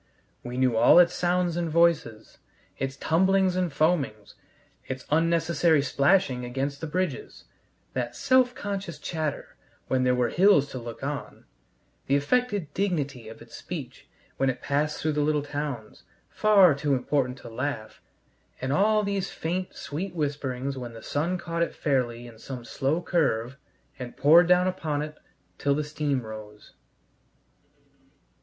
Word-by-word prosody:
We 120 +1 -6
knew 130 -2 +2
all 110 - +6
its 175 -1 +6
sounds 175 -1 0
and 170 -1 -1
voices, 160 -9 +1 0.4
its 135 0 -3
tumblings 190 +4 +2
and 180 -3 0
foamings, 140 -8 0 0.5
its 130 0 -5
unnecessary 165 -1 +3
splashing 140 -2 +2
against 135 +3 -3
the 160 - -3
bridges; 185 - -3 0.5
that - - -3
self 255 -1 +3
conscious 195 -4 -5
chatter 155 -4 -4 0.3
when 130 -1 +2
there 125 0 +3
were 125 -1 +1
hills 180 -6 +4
to 130 - -5
look 120 +1 -8
on; 145 +1 -5 0.6
the 140 - +3
affected 205 - 0
dignity 145 - -2
of 110 - -11
its - - -13
speech - - -8 0.3
when 135 - +2
it 130 - -3
passed 150 +2 0
through 155 - 0
the 150 0 0
little 150 0 +1
towns, 145 -6 -5 0.3
far 200 -6 +5
too 140 0 0
important 130 0 -1
to 120 - -12
laugh; 115 -2 -4 0.6
and 130 +1 -2
all 210 +6 +3
these 200 -2 -2
faint, 180 +3 -4
sweet 175 +5 -5
whisperings 140 -3 -2
when 120 -2 -7
the 115 -1 -11
sun 165 +6 -1
caught 170 -1 -4
it 170 - -1
fairly 120 -4 -1
in 115 -2 -13
some 125 -1 -8
slow 150 +9 -1
curve 135 -8 0 0.4
and 125 -1 -7
poured 165 +4 +6
down 180 0 +4
upon 155 -5 -2
it 150 0 -9 0.4
till 140 -1 +2
the 150 - -1
steam 145 -3 -2
rose. 105 -1 -10
145 Hz, 150 wpm, -26 LUFS, 130-175 Hz, 0.6 s, all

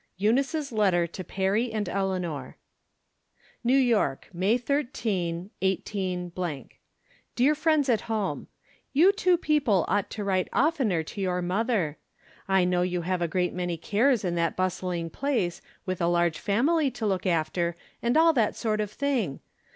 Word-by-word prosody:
EUNICE 250 - +2
S 295 -4 -3
LETTEE 190 -6 +2
TO 185 - -6
PEEBY 195 +6 0
AND 215 -3 -2
ELEAN"OE. 180 -8 -2 1.1
New 250 +3 +4
Yoek, 230 - +1
May 190 +7 +2
13, 215 - -2
18—. 180 -5 -2 0.7
Dear 265 +5 +4
Friends 305 -2 +2
at 230 -5 +2
Home: 215 -3 -2 0.5
You 335 +8 +6
two 365 -3 +2
people 285 - +2
ought 200 +2 0
to 210 - -5
write 190 -2 0
oftener 255 - +1
to 200 +5 -7
j'our 180 -1 0
mother. 185 - 0 0.5
I 190 -2 +3
know 180 0 +1
you 180 -1 0
have 180 +1 -1
a 170 - +1
great 180 +1 0
many 175 -1 -2
cares 220 - +2
in 175 - 0
that 170 -1 0
bustling 180 -2 -2
place, 240 -12 -1 0.2
with 185 -1 -3
a 170 - +2
large 170 -2 +1
family 275 +9 +2
to 245 -3 -5
look 190 -2 0
after, 170 0 0 0.3
and 240 +4 +2
all 325 0 +6
that 230 -7 +1
sort 215 -2 -1
of 210 - -2
thing 240 - -1
195 Hz, 155 wpm, -27 LUFS, 175-245 Hz, 1.1 s, You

